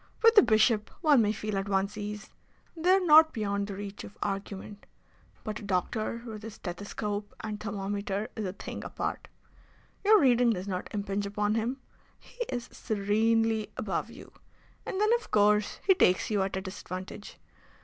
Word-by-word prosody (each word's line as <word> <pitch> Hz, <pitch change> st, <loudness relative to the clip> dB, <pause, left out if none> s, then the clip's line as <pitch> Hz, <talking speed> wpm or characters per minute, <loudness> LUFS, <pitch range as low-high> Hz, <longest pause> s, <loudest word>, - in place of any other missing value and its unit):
With 455 Hz, 0 st, +7 dB
a 415 Hz, -, +10 dB
bishop 215 Hz, -, +3 dB
one 295 Hz, -7 st, +5 dB
may 210 Hz, -1 st, +2 dB
feel 215 Hz, -2 st, -2 dB
at 195 Hz, +1 st, -4 dB
one's 195 Hz, +1 st, 0 dB
ease. 210 Hz, 0 st, -6 dB, 0.4 s
They 335 Hz, +2 st, 0 dB
are 380 Hz, +1 st, +6 dB
not 315 Hz, 0 st, +7 dB
beyond 200 Hz, -3 st, -1 dB
the 200 Hz, -, -5 dB
reach 200 Hz, 0 st, -7 dB
of -, -, -11 dB
argument. 200 Hz, 0 st, -5 dB, 0.6 s
But 215 Hz, -1 st, -4 dB
a -, -, -11 dB
doctor 215 Hz, +4 st, -2 dB
with 220 Hz, -3 st, -7 dB
his 220 Hz, 0 st, -8 dB
stethoscope 205 Hz, +2 st, -5 dB
and 210 Hz, -1 st, -5 dB
thermometer 200 Hz, 0 st, -3 dB
is 220 Hz, -, -3 dB
a 185 Hz, -, -4 dB
thing -, -, -7 dB
apart. -, -, -4 dB, 0.8 s
Your 425 Hz, +1 st, +7 dB
reading 245 Hz, -4 st, +4 dB
does 185 Hz, 0 st, -5 dB
not 185 Hz, -2 st, -3 dB
impinge 200 Hz, -1 st, -2 dB
upon 205 Hz, +1 st, 0 dB
him. 235 Hz, +4 st, -2 dB, 0.4 s
He 485 Hz, -, -7 dB
is 245 Hz, -2 st, -3 dB
serenely 220 Hz, +1 st, +1 dB
above -, -, -2 dB
you. -, -, -12 dB, 0.6 s
And 380 Hz, -, -3 dB
then, 425 Hz, +2 st, +4 dB
of 460 Hz, -, -15 dB
course, 210 Hz, 0 st, +3 dB
he 385 Hz, -, +7 dB
takes 185 Hz, -, +2 dB
you 205 Hz, -2 st, +2 dB
at 190 Hz, 0 st, -1 dB
a -, -, -2 dB
disadvantage. 185 Hz, +1 st, -8 dB
210 Hz, 170 wpm, -29 LUFS, 200-230 Hz, 0.8 s, a